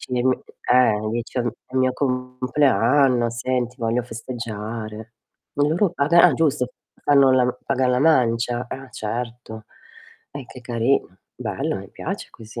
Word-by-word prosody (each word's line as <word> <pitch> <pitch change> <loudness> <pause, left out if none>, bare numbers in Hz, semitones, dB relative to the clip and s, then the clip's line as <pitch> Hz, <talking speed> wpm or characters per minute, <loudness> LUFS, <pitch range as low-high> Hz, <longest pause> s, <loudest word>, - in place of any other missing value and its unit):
Ci 125 - -10
mi 125 - +1 0.5
eh, 110 -4 +4
dicion 120 +1 -2 0.2
è 130 - -16
mio 130 -1 +2
compleanno, 125 -1 +2
senti 125 0 -2
voglio 115 +1 0
festeggiare. 115 -2 -6 0.4
Loro 160 +7 +2
paga 170 +1 +4
ah, - - +7
giusto 145 -6 +1 0.3
fanno 140 -2 +5
la 125 -1 +2
pagan 130 -2 +1
la 125 - +2
mancia. 120 -4 +2
Ah, 135 +1 -7
certo. 115 0 -5 0.7
Eh, 140 -2 -7
che 125 - -12
carino, 120 -4 0 0.2
bello - - -3
mi - - -10
piace - - -5
così. 115 +1 -10
125 Hz, 135 wpm, -22 LUFS, 115-130 Hz, 0.7 s, ah